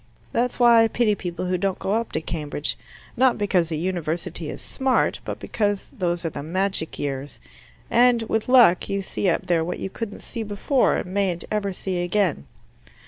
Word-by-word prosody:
That's 245 +2 0
why 235 -2 +7
I - - +4
pity 225 -1 +2
people 180 -2 -4
who 180 0 0
don't 195 0 0
go 195 - -2
up 230 +1 -1
to 155 - -1
Cambridge: 150 -2 -3 0.4
not 255 0 +3
because 185 -5 +1
a - - 0
University 170 -1 -3
is - - -6
smart, 265 -1 0
but - - -4
because 205 -3 -1
those 175 -1 -1
are 165 - -1
the - - -6
magic 185 +1 0
years, 140 0 -4 0.5
and 240 -1 +4
with 225 +1 -1
luck 240 -9 +6
you 195 0 -1
see 190 0 -1
up 175 - 0
there 170 -3 +2
what 175 +2 -3
you 190 - -5
couldn't 225 -1 -6
see 235 - -6
before 220 +5 +1
and 180 - -4
mayn't 190 -4 0
ever 210 -2 0
see 185 -1 -3
again. 175 - 0
190 Hz, 190 wpm, -24 LUFS, 170-220 Hz, 0.5 s, why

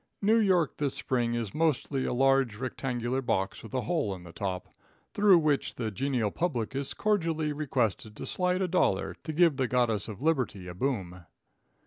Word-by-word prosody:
New 215 +3 +4
York 185 - +2
this 145 -3 -1
spring 120 -2 0
is 115 -4 -3
mostly 150 -4 0
a - - -1
large 135 -2 +3
rectangular 125 0 -2
box 100 -6 -1
with 115 - -11
a 130 - +1
hole 155 - -1
in 90 - -12
the 85 -1 -12
top, 95 -2 -3 0.5
through 200 -3 +6
which 150 -4 +1
the 110 -3 -3
genial 120 0 0
public 135 - -2
is 135 0 -2
cordially 165 -8 0
requested 115 -7 -1
to - - -6
slide 180 +1 0
a - - +1
dollar 180 +1 +1
to 160 - -4
give 160 -2 +4
the 130 -2 +1
goddess 115 -4 +1
of 110 -3 -7
liberty 130 - 0
a 90 - -6
boom. 90 -6 -3
130 Hz, 180 wpm, -29 LUFS, 110-160 Hz, 0.5 s, through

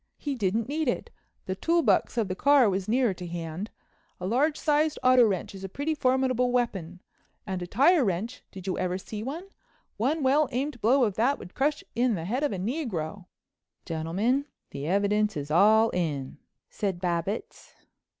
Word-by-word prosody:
He 290 - -3
didn't 220 -1 0
need 305 +2 -1
it. 245 - -2 0.3
The 185 - -2
tool 335 - +1
box - - +2
of 225 -4 +1
the 185 - -2
car 280 +4 +5
was 190 -1 -1
nearer 240 -1 +2
to 180 -1 -8
hand. 170 +4 -5 0.5
A 180 - -5
large 280 +9 +1
sized 305 0 +2
auto 255 -1 +6
wrench 195 -4 -2
is 195 0 -9
a 195 - -5
pretty 285 +10 -2
formidable 255 -3 +1
weapon, 190 -8 -2 0.4
and 190 -3 -3
a 175 - -4
tire 285 - +4
wrench—did 195 -1 -4
you 190 - -2
ever 180 0 -1
see 210 +2 -7
one? 320 - -6 0.5
One 285 +7 0
well 275 +2 +3
aimed 265 -1 -3
blow 255 +5 +4
of 210 -5 0
that 255 +6 +2
would 180 - -11
crush 295 +3 0
in 240 -1 +2
the 165 -2 -5
head 245 +9 -1
of 295 - +1
a 195 - -3
negro." 195 - -3 0.6
"Gentlemen, 190 - 0 0.3
the 140 +1 -5
evidence 205 +2 +1
is 145 +1 -5
all 215 +6 +5
in," 145 -6 -3 0.3
said 195 -4 -2
Babbitts. 175 +3 -3
215 Hz, 180 wpm, -27 LUFS, 185-265 Hz, 0.6 s, auto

